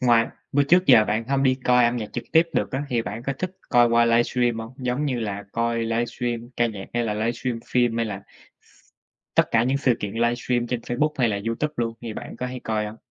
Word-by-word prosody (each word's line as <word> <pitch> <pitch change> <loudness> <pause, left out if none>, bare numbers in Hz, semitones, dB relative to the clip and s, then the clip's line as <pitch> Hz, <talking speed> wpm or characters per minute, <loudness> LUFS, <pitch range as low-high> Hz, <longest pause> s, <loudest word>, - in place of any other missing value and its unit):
ngoài 120 -2 +4 0.3
bữa 145 +1 +4
trước 180 +6 +4
giờ 120 -5 +7
bạn 110 +2 -1
hông 135 0 +1
đi 130 -1 +4
coi 125 -1 +5
âm 120 +1 +2
nhạc 110 -3 -5
trực 120 - -4
tiếp 160 - +7
được - - 0
á, 135 +2 -1
thì 120 -3 0
bạn 115 +1 -6
có 135 - -2
thích 185 - -2 0.2
coi 120 -1 +5
qua 115 0 +4
livestream 120 0 +2
hông? 115 +2 -7
Giống 130 +2 -2
như 130 -5 -1
là 100 -2 -4
coi 115 0 0
livestream 120 +1 -2
ca 120 - +3
nhạc, 105 -4 -6
hay 120 0 +1
là 105 -2 -1
livestream 115 +2 -2
phim, 120 -2 +1
hay 115 0 0
là 100 -2 -6 0.4
x - - -31 0.7
tất - - +5
cả 115 0 +3
những 135 +2 +1
sự 130 -3 +3
kiện 100 -1 -3
livestream 120 +1 0
trên 120 -1 -2
Facebook, 150 +6 -1
hay 125 -3 +3
là 100 -2 -1
YouTube 150 +7 -2
luôn 115 -1 -1
thì 115 -2 -5
bạn - - -8
có 125 - -3
hay 125 0 -6
coi 105 -1 -1
hông? 105 - -8
120 Hz, 245 wpm, -24 LUFS, 115-125 Hz, 0.7 s, giờ